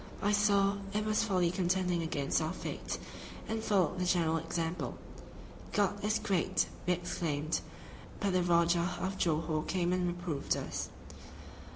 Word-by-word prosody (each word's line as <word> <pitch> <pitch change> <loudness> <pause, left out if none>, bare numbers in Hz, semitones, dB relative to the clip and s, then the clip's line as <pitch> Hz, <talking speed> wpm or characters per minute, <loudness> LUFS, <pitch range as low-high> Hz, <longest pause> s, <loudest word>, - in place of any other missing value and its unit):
I 205 - +3
saw 200 -1 +3 0.2
it 210 +1 0
was 215 +1 +2
folly 185 -5 +2
contending 180 -1 +1
against 150 -2 0
our 160 +2 -1
fate, - - -4 0.5
and 220 0 -2
followed 190 -5 +2
the 180 - +1
general 165 -3 +2
example. 165 -3 -3 0.8
"God 205 0 +1
is 215 +1 +2
great!" 190 -6 +1 0.2
we 180 - +5
exclaimed, 165 -3 -1 0.6
but 200 -2 +1
the 185 - +3
Rajah 170 +1 +3
of 190 +2 -3
Johore 155 -1 +1
came 175 +1 0
and 180 -1 +1
reproved 175 -5 -1
us. - - -4
180 Hz, 145 wpm, -32 LUFS, 165-195 Hz, 0.8 s, we